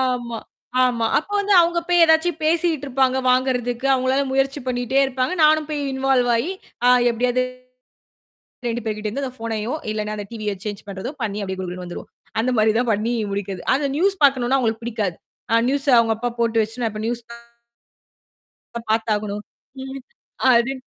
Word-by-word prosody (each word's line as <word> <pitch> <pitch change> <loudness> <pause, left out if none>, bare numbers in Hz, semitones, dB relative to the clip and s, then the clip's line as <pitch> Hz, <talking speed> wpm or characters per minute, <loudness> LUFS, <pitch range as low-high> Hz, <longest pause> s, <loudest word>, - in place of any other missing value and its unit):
ஆமா, 245 -3 -1 0.5
ஆமா. 235 -2 +1
அப்போ 405 +7 -7
வந்து 405 0 0
அவங்க 340 0 +2
போய் 350 -1 +5
ஏதாச்சுபேசிட்டு 320 -1 +2
இருப்பாங்க 265 0 +2
வாங்கரதுக்கு 250 0 0
அவங்களால 260 +2 +1
முயற்சி 270 +1 +1
பண்ணிட்டே 250 +1 0
இருப்பாங்க. 255 +3 -1
நானும் 305 0 +5
போய் 300 -1 -2
இன்வால்வ் 265 -2 +2
ஆயி 295 +10 -1 0.6
எப்டியாது 245 +2 +1 1.2
2 235 +1 -1
பேர்ட்ட 215 -1 -3
இருந்து 275 +7 -3
அந்த 255 - -5
ஃபோனையோ 225 +2 -3 0.2
இல்லனா 215 0 -3
அந்த 205 - -5
டிவிய 215 -3 -3
சேஞ்ச் 205 -1 -4
பண்றதோ 195 +5 -5
பண்ணி 210 -1 -2
அப்டியே 190 -1 -4
குடு 185 -1 -4
குடுனு 180 0 -6
வந்துருவோம். 175 - -8 0.3
அந்த 240 +3 +1
மாரி 215 0 +4
தான் 245 -1 +1
பண்ணி 215 +4 0 0.2
முடிக்கிறது. 195 -2 -4
அந்த 285 +2 0
நியூஸ் 390 +4 +2
பார்க்கணம்னா 265 -1 +3
அவங்களுக்கு 225 -2 -1
பிடிக்காது. 215 -7 -2 0.4
அ - - +5
நியூஸ்ஸ 280 +1 -1
அவங்க 225 -1 +3
அப்பா 245 +2 -2
போட்டு 230 -1 +2
வெச்சு 225 +3 -4
இப்ப 215 - -6
நியூஸ் 240 0 -2 1.7
பார்த்தாகணும். 210 -2 -1 0.4
ம். 270 0 -7 0.5
அது 235 +3 +3
245 Hz, 155 wpm, -22 LUFS, 220-270 Hz, 1.7 s, போய்